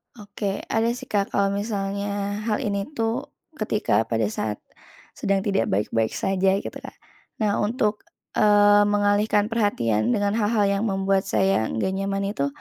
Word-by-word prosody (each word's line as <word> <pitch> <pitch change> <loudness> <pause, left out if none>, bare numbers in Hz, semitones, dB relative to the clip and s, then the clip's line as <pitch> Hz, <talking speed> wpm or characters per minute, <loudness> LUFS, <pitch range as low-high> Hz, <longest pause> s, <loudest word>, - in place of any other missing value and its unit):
Oke, 205 -2 -4
ada 225 +1 +2
sih, - - -10
Kak. 200 -1 +1
Kalau 200 0 +2
misalnya 200 0 -2
hal 215 - 0
ini 200 -1 -2
tuh, 230 +3 -1 0.3
ketika 210 - +1
pada 115 -1 0
saat 105 -1 -4 0.5
sedang 195 -1 -1
tidak 200 -2 +1
baik-baik 110 +3 0
saja 190 0 +1
gitu, - - -5
Kak. - - -10 0.5
Nah, 205 -1 +1
untuk, 210 -1 0 0.3
eee, 205 -1 +5
mengalihkan 205 +1 +2
perhatian 120 - +1
dengan 205 0 +1
hal-hal 210 0 +2
yang 200 +1 0
membuat 195 -1 0
saya 190 - +2
nggak 110 +12 -1
nyaman 195 0 -1
itu, 140 -8 -1
200 Hz, 150 wpm, -24 LUFS, 195-210 Hz, 0.5 s, eee